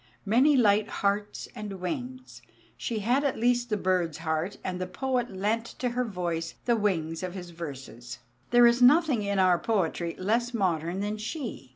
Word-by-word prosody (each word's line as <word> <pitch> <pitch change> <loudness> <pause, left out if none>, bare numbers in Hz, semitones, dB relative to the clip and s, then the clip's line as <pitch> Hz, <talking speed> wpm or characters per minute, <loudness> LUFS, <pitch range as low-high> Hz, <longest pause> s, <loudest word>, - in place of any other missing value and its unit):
"Many 260 +8 +4
light 210 -3 +4
hearts 205 0 -2
and 210 -5 -7
wings" 255 - -6 0.3
she 225 -4 -3
had 250 +7 +2
at 280 - 0
least 240 +1 +1
the 210 - 0
bird's 180 -5 0
heart, 160 +3 -2
and 185 -1 -3
the 185 - -2
poet 250 +4 -1
lent 210 +4 -1
to 250 - -1
her 245 +1 -1
voice 175 -6 -3
the 240 - +3
wings 165 -7 -1
of 185 0 -5
his 180 -2 -7
verses. 135 -7 -8 0.3
There 240 0 +6
is 235 +1 +4
nothing 290 -1 +5
in 200 -1 -1
our 185 -2 +4
poetry 170 -4 -1
less 235 +6 0
modern 175 -2 0
than 210 +1 -2
she. 235 - -5
205 Hz, 175 wpm, -28 LUFS, 180-240 Hz, 0.3 s, There